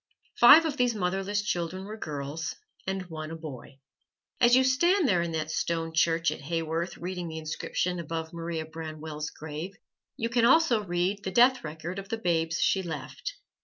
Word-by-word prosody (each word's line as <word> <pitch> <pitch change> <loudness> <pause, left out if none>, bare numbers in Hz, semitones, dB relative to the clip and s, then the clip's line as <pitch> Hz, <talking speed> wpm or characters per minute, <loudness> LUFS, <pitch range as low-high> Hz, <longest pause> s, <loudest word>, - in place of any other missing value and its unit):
Five 300 +7 +9
of 300 -3 -2
these 245 -2 +2
motherless 195 +2 -1
children 185 -1 -2
were 210 +2 -6
girls 150 -3 -4 0.3
and 190 0 -2
one 155 -3 -6
a 165 - -6
boy. 145 -5 -9 0.6
As 240 0 +6
you 260 - +5
stand 340 +7 +3
there 180 -7 +3
in 170 -1 -2
that 155 0 -2
stone 165 0 -1
church 165 0 +2
at - - -6
Haworth 165 +3 -2
reading 180 0 -4
the 160 -1 -6
inscription 170 +3 -2
above 165 0 -4
Maria 165 -1 -4
Branwell's 155 -1 -6
grave, 160 +5 -7 0.4
you 230 - -1
can 235 0 +2
also 245 -4 +5
read 185 +2 -1
the 190 - -2
death 250 +5 +5
record 160 +4 -5
of 195 0 -9
the 225 - -1
babes 165 -5 0
she 190 - +3
left. 165 - -6
170 Hz, 175 wpm, -28 LUFS, 160-205 Hz, 0.6 s, Five